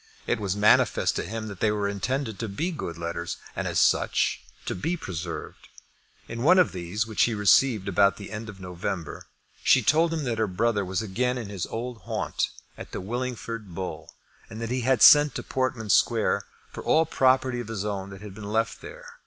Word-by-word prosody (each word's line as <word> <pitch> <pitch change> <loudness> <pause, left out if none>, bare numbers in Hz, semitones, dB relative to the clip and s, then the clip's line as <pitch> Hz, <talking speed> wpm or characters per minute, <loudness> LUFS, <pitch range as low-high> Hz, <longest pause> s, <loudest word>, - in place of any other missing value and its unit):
It 120 - 0
was 100 -2 -1
manifest 105 +1 +3
to - - -1
him 110 +3 -5
that 100 -3 -8
they 110 - +2
were 105 -1 0
intended 110 +3 -2
to 115 - -2
be 160 - -2
good 85 - -5
letters, 85 0 -4 0.2
and, - - -2
as - - -2
such, - - +2 0.2
to - - -2
be 165 - -2
preserved. 85 - -6 0.6
In 115 +1 -6
one 175 +8 +6
of 180 - +4
these, 95 +4 -3
which 110 -1 +2
he 115 - -1
received 105 +1 +4
about 100 +1 +3
the 100 - -9
end 110 +1 -6
of 100 -2 -10
November, 90 -2 -5 0.3
she 130 - +4
told 160 +7 +3
him 160 -2 -2
that 120 -4 -2
her 110 - +2
brother 105 +2 0
was 95 +1 -2
again 125 +5 -1
in 115 -5 -5
his 100 -4 -4
old 120 +1 -5
haunt, - - -2 0.3
at - - -9
the - - -3
Willingford 115 -2 -5
Bull, 95 0 -6 0.4
and 110 - -8
that 115 0 -4
he 130 0 0
had 125 -1 +3
sent 145 -1 +8
to - - -4
Portman 130 -5 -1
Square 100 -5 +2 0.3
for - - -7
all 160 +1 +3
property 130 -3 +2
of 120 - -5
his 110 -3 -4
own 100 -2 -3
that 95 0 -10
had 105 -2 -9
been 100 0 -7
left 115 +1 0
there. - - -10
110 Hz, 205 wpm, -26 LUFS, 100-125 Hz, 0.6 s, sent